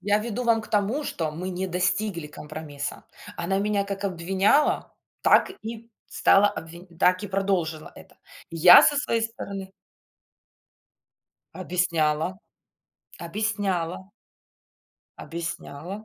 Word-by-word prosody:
Я 205 Hz, +1 st, +2 dB
веду 235 Hz, +3 st, -4 dB
вам 230 Hz, -1 st, +3 dB
к -, -, -12 dB
тому, 215 Hz, +8 st, 0 dB
что 160 Hz, -, -3 dB
мы 180 Hz, +4 st, -5 dB
не 185 Hz, +1 st, -3 dB
достигли 180 Hz, -1 st, -1 dB
компромисса. 150 Hz, -1 st, -7 dB, 0.3 s
Она 185 Hz, +3 st, -1 dB
меня 205 Hz, 0 st, 0 dB
как 200 Hz, 0 st, -5 dB
обвиняла, 195 Hz, -, +1 dB, 0.3 s
так -, -, +5 dB
и 230 Hz, +1 st, -8 dB, 0.2 s
стала 200 Hz, +1 st, +4 dB
обвинь 170 Hz, -1 st, -8 dB
так 185 Hz, +2 st, +3 dB
и -, -, -3 dB
продолжила 185 Hz, -5 st, -1 dB
это. -, -, -16 dB, 0.3 s
Я 170 Hz, +2 st, +9 dB
со 290 Hz, -, +4 dB
своей 230 Hz, -5 st, 0 dB
стороны 200 Hz, -5 st, -6 dB, 1.8 s
Объясняла, 175 Hz, -1 st, 0 dB, 0.8 s
объясняла. 190 Hz, -1 st, -2 dB, 1.1 s
Объясняла. 170 Hz, +3 st, -7 dB
190 Hz, 110 wpm, -25 LUFS, 170-210 Hz, 1.8 s, Я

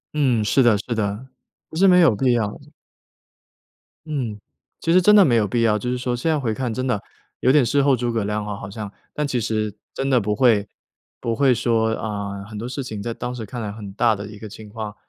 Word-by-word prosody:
嗯， 130 Hz, -7 st, +2 dB
是 135 Hz, +6 st, +3 dB
的 120 Hz, -4 st, +5 dB
是 115 Hz, +4 st, -4 dB
的， 105 Hz, +3 st, -2 dB, 0.4 s
不 -, -, -11 dB
是 195 Hz, +4 st, +5 dB
没 180 Hz, -1 st, +6 dB
有 130 Hz, -11 st, +5 dB
必 125 Hz, +4 st, +2 dB
要。 105 Hz, -3 st, -1 dB, 1.5 s
嗯。 130 Hz, -9 st, -3 dB, 0.4 s
其 165 Hz, -, 0 dB
实 180 Hz, +2 st, +6 dB
真 210 Hz, +4 st, +6 dB
的 205 Hz, -, +8 dB
没 135 Hz, -, +3 dB
有 105 Hz, -2 st, +2 dB
必 115 Hz, +4 st, 0 dB
要。 105 Hz, -2 st, +3 dB
就 125 Hz, -, -3 dB
是 125 Hz, -, -1 dB
说 125 Hz, 0 st, -2 dB
现 125 Hz, +7 st, -1 dB
在 155 Hz, -, +2 dB
回 120 Hz, -6 st, -1 dB
看 120 Hz, 0 st, -3 dB
真 130 Hz, +2 st, -2 dB
的， 115 Hz, -6 st, 0 dB, 0.4 s
有 130 Hz, -, +3 dB
点 145 Hz, -2 st, +5 dB
事 140 Hz, +5 st, +2 dB
后 135 Hz, -1 st, +4 dB
诸 120 Hz, -1 st, -2 dB
葛 115 Hz, -3 st, -1 dB
亮 105 Hz, 0 st, -2 dB
哈 105 Hz, -1 st, -4 dB
好 100 Hz, -, -8 dB
像， 105 Hz, 0 st, -7 dB, 0.2 s
但 150 Hz, -, -1 dB
其 130 Hz, -3 st, -1 dB
实， 110 Hz, -2 st, -1 dB, 0.2 s
真 135 Hz, 0 st, -2 dB
的 130 Hz, -, +4 dB
不 105 Hz, -1 st, -1 dB
会 110 Hz, -5 st, +3 dB, 0.5 s
不 115 Hz, -, -1 dB
会 135 Hz, 0 st, +4 dB
说， 115 Hz, -2 st, +1 dB
啊， 100 Hz, -3 st, -4 dB
很 105 Hz, +1 st, -9 dB
多 115 Hz, +3 st, -4 dB
事 135 Hz, +2 st, -4 dB
情 110 Hz, -5 st, -6 dB
在 115 Hz, +3 st, -3 dB
当 120 Hz, +2 st, -5 dB
时 120 Hz, -3 st, -6 dB
看 120 Hz, +3 st, -6 dB
来 105 Hz, -1 st, -4 dB
很 100 Hz, -2 st, -9 dB
大 115 Hz, +2 st, +3 dB
的 100 Hz, 0 st, -7 dB
一 105 Hz, 0 st, -10 dB
个 110 Hz, 0 st, -9 dB
情 110 Hz, +2 st, -11 dB
况， 105 Hz, 0 st, -6 dB
115 Hz, 265 characters per minute, -22 LUFS, 105-130 Hz, 1.5 s, 的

